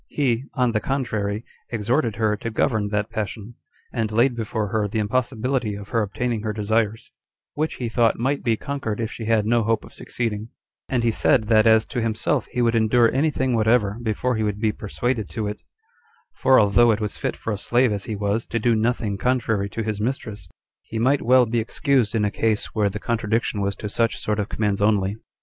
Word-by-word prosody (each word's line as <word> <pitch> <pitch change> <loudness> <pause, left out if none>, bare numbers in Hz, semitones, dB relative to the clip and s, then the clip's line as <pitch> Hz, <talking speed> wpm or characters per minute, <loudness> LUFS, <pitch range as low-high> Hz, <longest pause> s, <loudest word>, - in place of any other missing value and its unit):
He, 130 -3 0
on 125 -3 +2
the 110 - +1
contrary, 110 -5 -2 0.2
exhorted 115 +1 0
her 110 -1 +1
to 110 +2 -5
govern 110 -1 0
that 105 +1 -2
passion; 110 +1 -5 0.4
and 115 -3 -1
laid 120 +3 +3
before 110 -2 -2
her 105 0 0
the 105 - -4
impossibility 120 +1 -1
of 100 0 -9
her 115 -2 +1
obtaining 115 +2 -2
her 110 0 -2
desires, 110 +1 -1 0.4
which 155 +2 -2
he 120 - -3
thought 115 0 +2
might 135 +4 0
be 115 -2 +1
conquered, 140 -7 -4
if 115 -1 -2
she 115 - -6
had 110 -1 +2
no 120 +1 +3
hope 115 0 0
of - - -15
succeeding; 110 -2 -3 0.4
and 125 -3 0
he 115 - +3
said, 115 +2 +3
that 110 0 +5
as 110 0 +5
to 120 - -3
himself, 110 -1 0
he 125 - -1
would 115 -1 +2
endure 115 +1 +3
any 145 +5 +2
thing 130 -3 -1
whatever 110 -2 +2
before 120 +2 -1
he 110 - -1
would 105 -1 -2
be 110 -1 +2
persuaded 110 +1 -3
to 110 -2 -3
it; 105 +1 -5 0.7
for 130 0 +4
although 110 +3 +5
it 110 -1 +2
was 105 -2 -4
fit - - -2
for 115 - -3
a - - -3
slave, 120 +2 +2
as 100 -1 -3
he 110 -3 -3
was, 105 +2 -1
to 115 - -2
do 115 +1 +2
nothing 110 -3 0
contrary 115 -5 0
to 115 - -4
his 105 -1 -3
mistress, 110 -6 -4 0.3
he 115 - -7
might 130 +5 +2
well 125 +1 +5
be 115 +1 0
excused 120 -1 +1
in 105 -2 +2
a 105 - 0
case 110 0 0
where 105 -2 +2
the 100 - -5
contradiction 110 -1 -1
was 100 0 -1
to 105 - -6
such 115 +2 0
sort 105 0 -1
of 105 - -2
commands 105 -2 -1
only. 100 -1 +2
110 Hz, 210 wpm, -23 LUFS, 105-120 Hz, 0.7 s, that